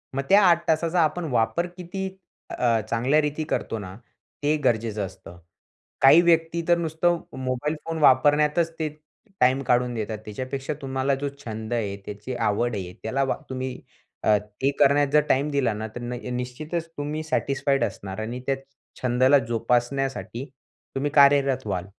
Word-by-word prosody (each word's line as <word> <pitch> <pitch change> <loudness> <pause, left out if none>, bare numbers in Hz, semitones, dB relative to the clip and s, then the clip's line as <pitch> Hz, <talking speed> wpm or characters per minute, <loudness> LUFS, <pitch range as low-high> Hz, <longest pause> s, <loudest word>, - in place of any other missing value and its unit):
मग 135 - 0
त्या 200 +2 +7
8 170 -1 +3
तासाचा 165 +2 +1
आपण 160 +2 0
वापर 120 +9 +1
किती 190 +2 -4 0.5
अ, 115 -2 +2
चांगल्या 125 +6 +2
रीती 150 +1 -2
करतो 115 - -2
ना 95 -1 -8 0.5
ते 150 +1 +3
गरजेचं 110 -4 0
असतं. 95 -2 -12 0.6
काही 135 +5 +8
व्यक्ती 165 -1 +2
तर 175 - +5
नुसतं 170 +1 0 0.2
मोबाईल 130 +4 -2
फोन 165 0 -3
वापरण्यातच 150 +4 +4
ते 155 - 0 0.5
टाईम 130 +2 +4
काढून 125 -1 +2
देतात. 110 -1 -3
त्याच्यापेक्षा 130 +6 -4
तुम्हाला 135 0 0
जो 140 +1 -3 0.2
छंद 110 +1 -5
आहे, 105 -4 -1
त्याची 105 +5 -6
आवड 115 +1 0
आहे, 90 -2 -5
त्याला 135 +5 0
वा 135 - -1
तुम्ही 130 -1 -4 0.4
अ, 105 -1 +5 0.2
ते 135 - +3
करण्यात 145 0 +5
जर 150 - +6
टाईम 140 +3 +2
दिला 135 -6 +1
ना, 110 +1 -4
तर 120 - -5
न 120 +1 -4
अ, 125 +1 -6
निश्चितच 150 +7 -4
तुम्ही 150 +2 -3
सॅटिस्फाईड 140 -3 0
असणार 95 -1 -4
आणि 120 +3 -4
त्या 135 - +2 0.5
छंदाला 130 +3 +4
जोपासण्यासाठी 120 +2 -1 0.5
तुम्ही 140 +2 -1
कार्यरत 140 -3 +4
व्हाल. 95 -2 -2
135 Hz, 160 wpm, -25 LUFS, 120-150 Hz, 0.6 s, काही